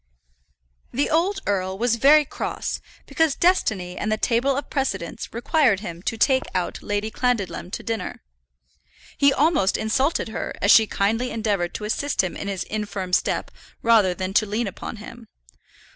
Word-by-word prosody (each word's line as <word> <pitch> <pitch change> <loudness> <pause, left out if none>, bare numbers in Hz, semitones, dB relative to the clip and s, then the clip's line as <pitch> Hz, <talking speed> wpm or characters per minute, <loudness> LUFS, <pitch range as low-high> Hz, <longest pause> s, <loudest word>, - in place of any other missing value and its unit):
The 280 +4 0
old 375 +5 +1
earl 190 -1 -1
was 230 +1 +1
very 295 +5 +6
cross - - -4 0.2
because 320 -4 +1
destiny 215 - +1
and 215 - -2
the 215 - +1
table 255 +5 +1
of 280 - -4
precedence 195 - -3
required 235 -3 +2
him 170 -5 -7
to 225 +4 -3
take 260 +3 +3
out 180 -1 -2
Lady 205 +1 -2
Clandidlem 230 -7 -1
to - - -6
dinner. 225 -4 -4 0.9
He 280 0 +4
almost 285 - +2
insulted 260 +5 0
her, 220 - -4
as 200 - +4
she 220 -1 +7
kindly 225 +6 0
endeavoured 205 -7 -1
to - - -5
assist 270 +3 0
him 185 - -3
in - - -5
his 195 -2 -2
infirm 205 -4 -4
step - - +1 0.3
rather 215 -6 +4
than 185 +1 -4
to 215 +1 +3
lean 215 +4 -1
upon 195 - -6
him. 230 +2 -11
220 Hz, 160 wpm, -23 LUFS, 195-265 Hz, 0.9 s, she